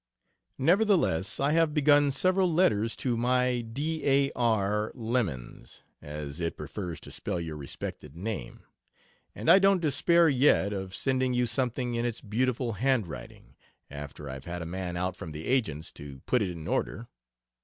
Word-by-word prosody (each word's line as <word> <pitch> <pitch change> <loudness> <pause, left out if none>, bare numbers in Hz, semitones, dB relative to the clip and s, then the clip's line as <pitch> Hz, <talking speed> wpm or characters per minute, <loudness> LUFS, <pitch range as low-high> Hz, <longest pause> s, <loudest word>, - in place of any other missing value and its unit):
Nevertheless 170 - +2
I 140 +2 +2
have 165 -1 +2
begun 145 -1 +5
several 185 +5 +2
letters 115 - +2
to 125 -3 -1
My 125 +1 +1
d 145 +7 -3
a 140 0 +3
r 105 -3 +1
lemans, 110 - -3 0.2
as 75 0 -6
it 85 -1 -2
prefers 90 -6 -6
to - - -10
spell 90 - -3
your 80 -2 -5
respected 70 0 -7
name, 95 - -5 0.7
and - - -6
I 195 - +8
don't 195 -1 +4
despair 170 +2 +3
yet 130 -7 +3
of 95 -1 -5
sending 130 -1 0
you 125 0 +2
something 125 0 -1
in 115 0 -1
its 120 -1 -2
beautiful 120 +2 -1
handwriting 115 -4 -2 0.4
after 75 0 -8
I've 65 0 -7
had 85 0 -5
a - - -6
man 90 0 -4
out 90 0 -1
from 85 -5 -8
the 75 +1 -7
agent's 100 - 0
to 70 -2 -10
put 125 - +1
it 100 - 0
in 85 -3 -7
order. - - -2
115 Hz, 160 wpm, -28 LUFS, 85-135 Hz, 0.7 s, I